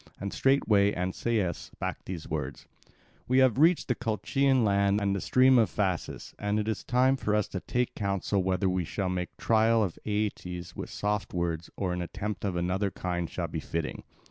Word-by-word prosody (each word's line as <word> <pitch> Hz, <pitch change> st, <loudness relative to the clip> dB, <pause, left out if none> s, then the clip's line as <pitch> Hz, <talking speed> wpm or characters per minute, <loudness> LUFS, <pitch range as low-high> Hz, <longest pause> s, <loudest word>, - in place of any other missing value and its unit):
And 100 Hz, 0 st, -4 dB
straightway 105 Hz, -7 st, +3 dB
Ancaeus 95 Hz, 0 st, -1 dB
spake -, -, -5 dB
these 90 Hz, -4 st, -6 dB
words: 75 Hz, -3 st, -4 dB, 0.6 s
"We 130 Hz, -, +2 dB
have 130 Hz, -2 st, +4 dB
reached 165 Hz, +3 st, +4 dB
the 125 Hz, -, +2 dB
Colchian 125 Hz, +3 st, +1 dB
land 100 Hz, 0 st, +3 dB
and 100 Hz, -1 st, 0 dB
the 100 Hz, -, -2 dB
stream 130 Hz, 0 st, +5 dB
of 110 Hz, -, +3 dB
Phasis; 95 Hz, -5 st, -2 dB
and 105 Hz, +1 st, 0 dB
it 105 Hz, -, -2 dB
is 110 Hz, -, -2 dB
time 130 Hz, +2 st, +3 dB
for 105 Hz, -4 st, 0 dB
us 105 Hz, -2 st, +1 dB
to 95 Hz, -, -3 dB
take 125 Hz, +6 st, -1 dB
counsel 100 Hz, -1 st, 0 dB
whether 95 Hz, +1 st, +1 dB
we 90 Hz, -1 st, +1 dB
shall 90 Hz, +4 st, -2 dB
make 90 Hz, -1 st, -3 dB
trial 110 Hz, 0 st, +3 dB
of 90 Hz, -5 st, -3 dB
Aeetes 90 Hz, -5 st, -3 dB
with -, -, -6 dB
soft 105 Hz, -2 st, -2 dB
words, 85 Hz, -1 st, -2 dB
or 95 Hz, -3 st, -1 dB
an 90 Hz, -, -2 dB
attempt 105 Hz, +4 st, -4 dB
of 95 Hz, -3 st, -1 dB
another 90 Hz, +3 st, 0 dB
kind 90 Hz, -2 st, -3 dB
shall -, -, -3 dB
be -, -, -4 dB
fitting." 80 Hz, -2 st, -4 dB
100 Hz, 190 wpm, -29 LUFS, 90-110 Hz, 0.6 s, stream